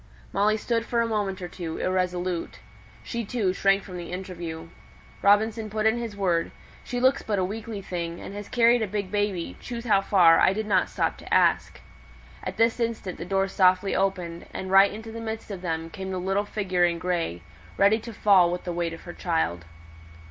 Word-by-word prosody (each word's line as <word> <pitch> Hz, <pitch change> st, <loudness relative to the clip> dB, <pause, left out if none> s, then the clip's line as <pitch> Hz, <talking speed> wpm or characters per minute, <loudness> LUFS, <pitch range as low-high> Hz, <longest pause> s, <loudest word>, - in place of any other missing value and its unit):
Molly 210 Hz, +2 st, +2 dB
stood 230 Hz, +1 st, -1 dB
for 235 Hz, 0 st, -1 dB
a -, -, +1 dB
moment 205 Hz, -4 st, -2 dB
or -, -, -3 dB
two, 170 Hz, -2 st, -6 dB
irresolute. 180 Hz, -1 st, -1 dB, 0.5 s
She, 235 Hz, -1 st, -3 dB
too, 205 Hz, -4 st, 0 dB
shrank 195 Hz, 0 st, +2 dB
from 185 Hz, -3 st, -8 dB
the 175 Hz, -1 st, -7 dB
interview. 170 Hz, -3 st, -6 dB, 0.5 s
Robinson 215 Hz, +2 st, +3 dB
put 215 Hz, +1 st, -2 dB
in 220 Hz, +2 st, +3 dB
his 225 Hz, -4 st, -5 dB
word: 175 Hz, -4 st, +1 dB, 0.3 s
"She 245 Hz, -, -3 dB
looks 260 Hz, +2 st, +3 dB
but 210 Hz, -2 st, -2 dB
a 185 Hz, -, +1 dB
weakly 215 Hz, +1 st, -6 dB
thing, 170 Hz, -2 st, -4 dB
and -, -, -8 dB
has 205 Hz, 0 st, -7 dB
carried 235 Hz, 0 st, +4 dB
a 220 Hz, -, 0 dB
big 200 Hz, -1 st, -3 dB
baby, 205 Hz, -4 st, -1 dB
choose 235 Hz, -1 st, -6 dB
how 205 Hz, -4 st, +4 dB
far, 180 Hz, -4 st, +5 dB
I 185 Hz, -, +5 dB
didn't 205 Hz, -3 st, +1 dB
stop -, -, -1 dB
to -, -, -12 dB
ask." -, -, +2 dB, 0.6 s
At -, -, -5 dB
this 230 Hz, +1 st, +2 dB
instant 230 Hz, -5 st, -3 dB
the -, -, -5 dB
door 195 Hz, +1 st, +1 dB
softly 185 Hz, 0 st, +3 dB
opened, 180 Hz, -3 st, -2 dB
and 190 Hz, 0 st, -5 dB
right 195 Hz, +1 st, +7 dB
into 225 Hz, +1 st, -8 dB
the 230 Hz, +1 st, -7 dB
midst 220 Hz, -1 st, -5 dB
of 190 Hz, -3 st, -6 dB
them 165 Hz, -2 st, -3 dB
came 190 Hz, 0 st, -6 dB
the 185 Hz, -, -3 dB
little 195 Hz, +3 st, 0 dB
figure 190 Hz, -4 st, 0 dB
in 170 Hz, -1 st, +2 dB
grey, 170 Hz, -, -1 dB
looking 85 Hz, -, -13 dB, 0.4 s
ready 200 Hz, +3 st, +4 dB
to 230 Hz, +1 st, -8 dB
fall 195 Hz, -5 st, +4 dB
with 180 Hz, -, -4 dB
the 175 Hz, -, -4 dB
weight 170 Hz, -1 st, -2 dB
of 165 Hz, -, -9 dB
her 175 Hz, -, -8 dB
child. 85 Hz, -, -1 dB
195 Hz, 205 wpm, -26 LUFS, 180-215 Hz, 0.6 s, right